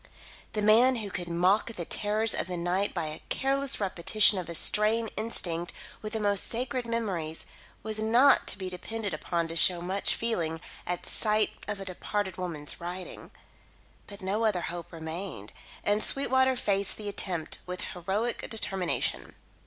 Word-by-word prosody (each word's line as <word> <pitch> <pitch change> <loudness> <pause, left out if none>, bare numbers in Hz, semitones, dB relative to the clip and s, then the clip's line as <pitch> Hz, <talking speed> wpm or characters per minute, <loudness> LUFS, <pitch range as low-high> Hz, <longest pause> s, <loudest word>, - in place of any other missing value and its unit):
The 210 -1 -1
man 235 +5 +6
who 210 -4 -4
could 175 -1 -4
mock 185 +7 +2
the 175 -5 -5
terrors 215 +4 +2
of - - -1
the 180 -1 -4
night 180 +4 0
by 170 -3 -2
a 155 0 -6
careless 275 0 +3
repetition 200 +1 +4
of 175 - -6
a 170 - -3
strain 215 +6 +3
instinct 175 -6 -1 0.3
with 215 +1 -6
the 220 - -1
most 205 -2 +3
sacred 250 +1 -2
memories, 190 -9 -2 0.4
was 215 0 -2
not 240 +6 +5
to - - -1
be 190 -1 -5
depended 200 +2 -4
upon 170 +2 -2
to 165 - -5
show 175 +2 +4
much 185 +3 +1
feeling 170 -9 -1 0.3
at 180 0 -3
sight 215 -1 +2 0.2
of 205 -1 -3
a 195 - -6
departed 190 +1 -3
woman's 165 -6 -3
writing. 180 +1 -7 0.8
But 200 -1 -10
no 205 +4 0
other 210 -5 +2
hope 170 0 -6
remained, 160 - -6 0.3
and 205 +1 +2
Sweetwater 260 -1 +3
faced 200 -4 +3
the 210 - -7
attempt 180 -5 -3
with 180 0 -5
heroic 195 +7 -2
determination. 195 -5 -1
200 Hz, 160 wpm, -29 LUFS, 175-220 Hz, 0.8 s, man